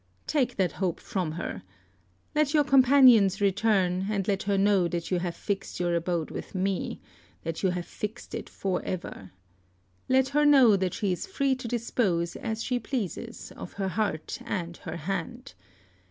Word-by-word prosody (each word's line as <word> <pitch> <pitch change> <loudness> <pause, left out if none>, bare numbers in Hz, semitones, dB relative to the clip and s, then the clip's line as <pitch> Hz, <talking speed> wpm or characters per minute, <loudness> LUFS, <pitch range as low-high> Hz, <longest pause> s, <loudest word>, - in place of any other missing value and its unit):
Take 255 -5 0
that 185 -3 +1
hope 185 -4 -2
from 180 -5 -3
her. 160 - -5 0.7
Let 300 0 +2
your 300 - +5
companions 255 -7 +6
return, 195 -2 +2
and 200 -3 -1
let 200 -2 +1
her 200 - +2
know 195 -2 +3
that 170 0 -4
you 180 - +2
have 175 -1 -3
fixed 200 -2 -4
your 175 -1 +1
abode 170 -1 -1
with - - -7
me, 190 0 -1 0.4
that 165 -1 -4
you 190 - +2
have 180 -1 -3
fixed 215 +3 -6
it - - -5
for 190 -2 -2
ever. 170 - -5 0.8
Let 265 0 +3
her 295 +2 +2
know 270 -7 +7
that 185 -2 -1
she 200 -3 0
is 180 - -3
free 275 -8 +1
to 255 -2 -5
dispose 210 -7 0
as 225 -1 -3
she 250 -1 0
pleases 230 -5 -5
of - - -9
her 195 -1 -2
heart 205 - -2
and 175 -7 -3
her 170 - -6
hand. 195 - -4
195 Hz, 170 wpm, -27 LUFS, 180-245 Hz, 0.8 s, know